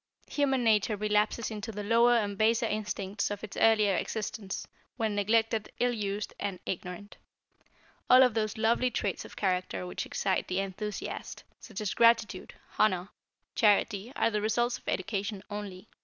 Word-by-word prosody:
Human 270 -3 +1
nature 215 -1 +3
relapses 210 +2 0
into 215 +1 -5
the 210 -1 -5
lower 235 +3 +4
and 205 -3 -1
baser 225 +3 +2
instincts 210 -2 -2
of 205 0 -5
its 215 - -7
earlier 215 -3 +4
existence, 210 +1 -4 0.3
when 220 -3 0
neglected, 220 +2 +1
ill 245 0 +2
used 205 -2 -3
and 195 -3 -3
ignorant. 180 +3 -6 0.9
All 255 +1 +9
of 250 -3 +3
those 215 -1 -1
lovely 235 +3 +2
traits 240 - -2
of - - -12
character 180 - -1
which 90 - -5
excite - - -1
the 185 - -2
enthusiast, 195 +2 -5 0.2
such 215 -3 -8
as 210 - -1
gratitude, 230 -4 +3 0.2
honor, 185 -3 +2 0.4
charity 210 +1 +2
are 230 - +2
the 210 -1 0
results 240 +3 0
of - - -29
education 200 +1 -2
only. 205 -1 -6
210 Hz, 155 wpm, -29 LUFS, 200-225 Hz, 0.9 s, All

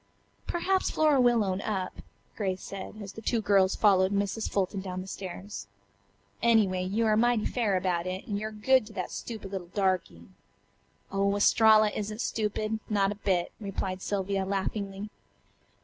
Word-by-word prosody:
"Perhaps 375 +2 +1
Flora 300 -4 +3
will 240 -3 +4
own 190 -1 -1
up," 190 -4 -3 0.4
Grace 190 -3 -2
said, 200 +2 -7
as 195 - -8
the 225 - -9
two 230 +1 0
girls 195 -3 +3
followed 190 -2 +4
Mrs. 200 +2 -1
Fulton 195 0 -1
down 185 -1 -5
the - - -8
stairs. 190 - -7 0.7
"Anyway, 210 -6 +3
you 205 +5 0
are 215 -1 +3
mighty 235 -1 +2
fair 215 -6 +1
about 180 -1 -1
it, 185 +1 -4
and 205 -1 -2
you're 215 +1 -4
good 215 +2 +3
to 215 - -12
that 185 -3 -4
stupid 215 -5 -6
little 190 -3 -5
darky." 185 - -1 0.9
"Oh, 200 +1 +1
Estralla 215 +1 +5
isn't 215 +1 -4
stupid. 215 -1 -1
Not 200 -2 +2
a 205 0 -8
bit," 180 -3 +1
replied 195 -2 -4
Sylvia 195 -1 -1
laughingly. 195 +1 -3
200 Hz, 160 wpm, -28 LUFS, 190-215 Hz, 0.9 s, Estralla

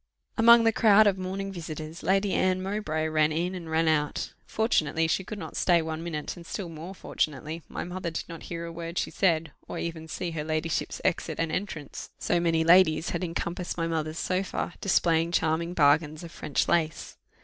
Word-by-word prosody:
Among 235 0 +7
the 225 - +4
crowd 215 -1 +6
of 195 -2 +2
morning 195 +1 -3
visitors, 160 -2 -7
Lady 195 +3 +2
Anne 185 0 +1
Mowbray 185 -6 -1
ran 155 0 +2
in 170 +4 -1
and 175 -3 -7
ran 160 +1 +2
out; 150 -2 0
fortunately 165 -8 +1
she 175 +4 0
could 210 +3 -7
not 160 -5 -7
stay 175 -2 +4
one 160 0 -4
minute, 155 -3 -4
and 175 - -11
still 175 +1 -5
more 165 +4 -8
fortunately 155 0 -3
my - - -4
mother 180 0 -4
did 160 - -5
not 165 -2 -8
hear 170 -1 -4
a 170 - -6
word 170 +1 -6
she - - -1
said, 165 -4 +1 0.2
or - - -5
even 165 -1 -4
see 170 +2 -4
her 155 -2 -3
ladyship's 155 +1 -2
exit - - 0
and 165 -1 0
entrance, 160 -7 -5
so 175 - +1
many 165 -1 +2
ladies 165 -1 +5
had - - -2
encompassed 170 +1 -3
my 165 - 0
mother's 160 -1 -2
sofa, 185 -1 -2
displaying 170 -3 +2
charming 170 +1 0
bargains 150 +1 +3
of 170 - -9
French 145 - -1
lace. 160 -2 0
165 Hz, 195 wpm, -27 LUFS, 160-185 Hz, 0.2 s, Among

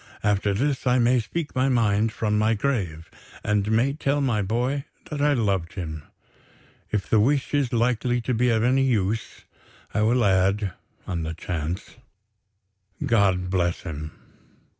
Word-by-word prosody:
After 100 -1 +1
this, 135 +3 -1
I 125 0 +4
may 125 +1 +4
speak 150 +7 -4
my 130 +1 +2
mind 110 -3 +2
from 105 -1 -1
my 110 +2 +2
grave, 100 - -2 0.3
and 105 -1 +1
may 120 +5 +2
tell 145 -1 0
my 125 -7 +1
boy 125 +8 -1 0.3
that 145 -1 -3
I 145 0 +4
loved 100 -9 0
him. 80 -5 -5 0.9
If 105 -3 -2
the 110 - +3
wish 135 +7 +1
is 140 -4 +1
likely 120 +1 +1
to 125 +2 -1
be 125 +2 +2
of 110 -1 +2
any 130 +2 +3
use, 110 -4 -1 0.5
I 105 - +1
will 115 +2 +3
add 95 0 +2 0.3
(on 85 -2 -3
the 80 +1 -4
chance) 85 +5 -4 1.1
God 95 -7 +2
bless 90 -2 0
him." 75 -1 -6
110 Hz, 155 wpm, -24 LUFS, 95-125 Hz, 1.1 s, I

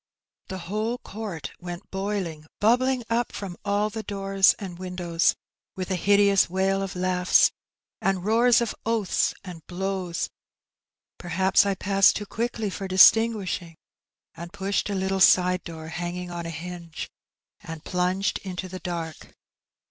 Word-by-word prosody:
The 190 - -5
whole 215 +6 -2
oonrt 205 -9 -7
Went 175 +1 -8
boiling, 190 -6 -3
bubbling 250 +3 +3
up 235 +1 0
from 190 -3 -6
all 205 +1 0
the 220 - -4
doors 195 -2 +2
And 180 -4 -8
wtndovra, 180 -2 0 0.4
irith 185 0 -4
a - - +2
hideous 200 +1 +4
wail 190 +2 +1
of 195 -1 -4
langha 180 0 +3 0.5
And 190 -2 0
Toar 230 +3 +4
of 230 - -3
oatJia, 225 -4 0
and 175 -4 -10
blows, 185 -1 -3 0.9
perhaps.... 190 +3 +2
I 200 - +1
passed 195 +1 +4
Too 205 - -3
qaiokl^ 225 -2 -3
for 195 - -5
diBtangnieliing,.... 190 -3 +4 0.6
and 170 +1 -9
pnahed 200 +1 -1
A 200 - -2
little 190 0 -1 0.2
aide 180 0 -1
door 160 -2 -8
hanging 175 +2 -5
on 170 -1 -5
a - - -4
hinge. 170 0 -7 0.5
And 160 -1 -8
plnnged 180 +2 0
into 185 -1 -6
the 185 0 -7
dark. 165 -3 -6
190 Hz, 140 wpm, -25 LUFS, 175-205 Hz, 0.9 s, hideous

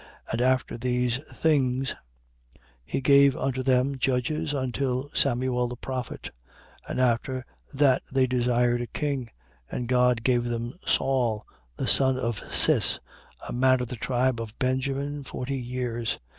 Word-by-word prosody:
And 115 - -1
after 130 -2 +1
these 125 0 0
things, 135 -4 +1 0.9
he 75 - -3
gave 140 0 +5
unto 130 -1 -1
them 130 +1 +1
judges, 135 +5 0
until 130 0 -2
Samuel 125 -1 +1
the 120 - -6
prophet. 125 0 -5 0.6
13:21. - - -14
And - - -2
after 130 +1 0 0.3
that 135 -2 +3
they 135 -1 +3
desired 120 -1 +1
a 120 - -4
king: 140 -5 -3 0.4
and 125 - -4
God 125 -2 +3
gave 120 -1 +2
them 120 0 -3
Saul 120 -5 +1 0.3
the - - -3
son 130 -1 +3
of 115 -5 -2
Cis, - - +5 0.5
a - - -5
man 130 +1 +3
of 125 -2 -4
the - - -4
tribe 125 0 0
of 110 -1 -8
Benjamin, 140 +2 -1
forty 135 +1 -4
years. 120 -2 -3
125 Hz, 145 wpm, -26 LUFS, 120-135 Hz, 0.9 s, gave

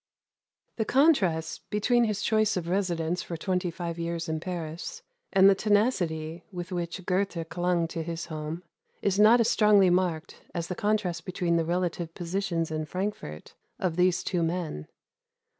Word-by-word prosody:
The 220 - 0
contrast 195 - +2
between 235 +3 +2
his 210 -2 -2
choice 215 -2 +2
of 170 -2 -3
residence 175 -2 0
for 170 - -6
twenty 180 +1 -1
five 170 0 -5
years 170 0 -3
in 160 0 -2
Paris, 175 - -5 0.3
and 195 -1 +6
the 200 - +8
tenacity 175 -7 0
with 180 0 -6
which 175 +1 -4
Goethe 185 -3 -1
clung 175 -1 0
to 165 - -4
his 165 +1 -4
home, 155 +2 -5 0.4
is 200 0 +1
not 220 +3 +7
as 230 0 +3
strongly 205 -4 +5
marked 175 -3 -1
as 170 -1 -3
the - - -1
contrast 190 -5 0
between 180 -2 0
the 165 -1 +2
relative 175 -1 -2
positions 170 -2 -2
in 155 0 -2
Frankfort 180 - -5 0.2
of 180 -4 -1
these 180 0 +2
two 180 -3 -1
men. 165 - -2
180 Hz, 160 wpm, -28 LUFS, 165-195 Hz, 0.4 s, the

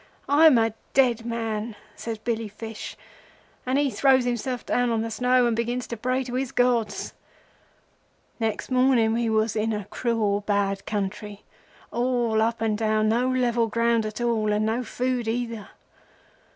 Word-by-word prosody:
I'm 295 -1 +6
a 225 -1 +2 0.2
dead 240 -3 +3
man,' 225 -1 -3 0.2
says 225 -1 -5
Billy 225 0 -2
Fish, 220 +1 -8 0.7
and 260 +2 +2
he 285 -2 +2
throws 260 -2 +3
himself 245 +1 -2
down 245 0 +1
on 225 -1 0
the 230 - -4
snow 250 +2 +3
and 235 -1 +1
begins 240 +2 -2
to 235 - -5
pray 255 +3 -1
to 245 -1 -7
his 260 0 -2
gods. 245 -3 0 1.3
"Next 225 +2 -2
morning 255 -3 +3
we 230 0 0
was 220 0 +1
in 220 +1 0
a 210 -2 -4
cruel 215 -2 0
bad 200 -1 0
country—all 220 +3 -3
up 230 0 0
and 220 -1 +1
down, 215 0 +1
no 245 +3 +2
level 240 -2 +1
ground 230 0 +1
at 215 - -7
all, 225 -3 +1
and 210 +1 +1
no 225 +3 0
food 250 -1 -2
either. 230 -2 -3
230 Hz, 155 wpm, -25 LUFS, 220-245 Hz, 1.3 s, I'm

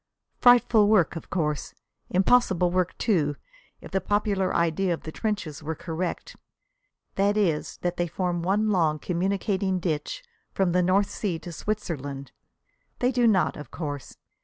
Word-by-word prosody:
Frightful 240 -3 +6
work, 200 -6 +3
of 165 - -8
course. 150 -5 -2 0.3
Impossible 185 -2 +3
work, 180 -1 0
too, 155 -10 +1 0.5
if - - -11
the 190 0 0
popular 200 -1 0
idea 170 +2 +1
of - - -16
the 155 - -6
trenches 195 -8 -3
were 160 +1 -4
correct 170 +2 -4 0.8
that 200 +2 +2
is, 170 -8 0
that 175 0 -1
they 175 - 0
form 175 0 -2
one 205 +5 +1
long, 160 -5 +2
communicating 190 +3 -1
ditch 175 - -3 0.3
from 190 -2 +1
the 180 +1 +3
North 190 +3 +2
Sea 190 -6 -2
to 175 - -9
Switzerland! 145 - -4 0.7
They 250 +1 +1
do 245 -2 +3
not, 190 -6 +3
of 150 - -9
course. 145 -5 -6
180 Hz, 150 wpm, -26 LUFS, 165-205 Hz, 0.8 s, Frightful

